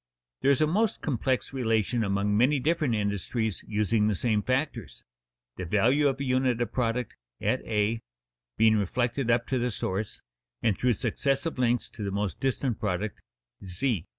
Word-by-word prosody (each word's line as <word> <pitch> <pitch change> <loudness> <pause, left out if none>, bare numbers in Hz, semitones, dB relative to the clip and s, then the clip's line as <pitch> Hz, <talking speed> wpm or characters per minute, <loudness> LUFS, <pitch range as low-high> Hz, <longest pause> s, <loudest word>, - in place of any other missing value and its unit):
There 135 - +3
is 140 0 +4
a - - +6
most 210 +8 +1
complex 130 -2 -1
relation 115 -2 +1
among 100 0 +1
many 130 +6 +4
different 150 -3 +1
industries 105 +1 -1
using 105 0 +1
the 105 - +1
same 110 +1 +1
factors, 130 - -2 0.5
the 90 - -4
value 120 - +3
of 135 -1 -1
a - - -2
unit 130 -2 +1
of 120 - -1
product 125 0 -1 0.2
(at - - 0
a) 110 +1 0 0.6
being 110 -1 +5
reflected 120 +5 0
up 115 0 +3
to 130 - +1
the 125 +1 0
source, 100 -1 -3 0.4
and 110 -4 +3
through 125 +5 +2
successive 135 - -1
links 120 -1 +2
to 110 - -11
the 100 - -1
most 100 -1 -2
distant 130 -3 -1
product 100 +1 -2 0.4
(z). 95 - -1
115 Hz, 165 wpm, -28 LUFS, 105-130 Hz, 0.6 s, a